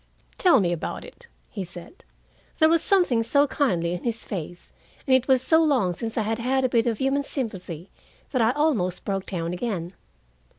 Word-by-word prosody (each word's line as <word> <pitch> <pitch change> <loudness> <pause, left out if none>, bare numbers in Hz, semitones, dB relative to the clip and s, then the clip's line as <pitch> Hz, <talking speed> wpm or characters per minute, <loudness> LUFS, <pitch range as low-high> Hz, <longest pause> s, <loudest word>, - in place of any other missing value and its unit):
"Tell 350 -8 +5
me 175 -2 +1
about 175 0 -4
it," 475 - -15 0.2
he 200 - -4
said. 175 - -9 0.5
There 315 - +5
was 330 0 +3
something 350 -13 +3
so 280 +5 +3
kindly 190 - 0
in 180 - -5
his 230 -2 -3
face, 175 -2 -7 0.3
and 265 -3 +4
it 260 -1 +1
was 260 -2 +3
so 320 +4 +4
long 255 - +2
since 225 +5 -5
I 220 - +2
had 225 +2 -2
had 265 +3 +1
a 255 - +2
bit 235 -1 +2
of 225 -2 0
human 270 +3 +1
sympathy, 190 - -5 0.4
that 255 - +1
I 225 - +4
almost 255 - 0
broke 195 -1 -2
down 170 -2 -3
again. 180 -3 -3
230 Hz, 195 wpm, -25 LUFS, 180-270 Hz, 0.5 s, Tell